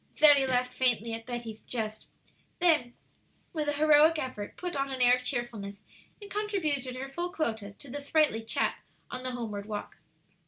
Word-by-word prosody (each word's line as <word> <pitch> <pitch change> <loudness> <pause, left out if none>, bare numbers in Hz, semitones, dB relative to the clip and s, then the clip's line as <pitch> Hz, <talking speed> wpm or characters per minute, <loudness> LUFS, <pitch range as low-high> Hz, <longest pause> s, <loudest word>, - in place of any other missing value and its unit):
Zoe 290 -3 +7
laughed 250 -1 +1
faintly 235 -3 +1
at 225 +1 -6
Betty's 235 -3 -5
jest; 215 -3 -4 0.5
then, 310 -9 +2 0.6
with 305 -3 -2
a - - +1
heroic 305 +2 +5
effort, 255 -8 -5
put 355 -1 -4
on 275 0 -1
an 265 -1 -4
air 245 0 +6
of 250 0 +1
cheerfulness, 230 -6 -3 0.4
and 405 -2 -11
contributed 315 -12 -1
her 265 +1 -5
full 345 +6 -4
quota 220 - -2
to 285 - -12
the 285 +3 -5
sprightly 285 -6 +2
chat 225 - 0 0.3
on 250 - -4
the 255 - -2
homeward 215 -4 -5
walk. 210 -1 -5
255 Hz, 170 wpm, -29 LUFS, 230-300 Hz, 0.6 s, Zoe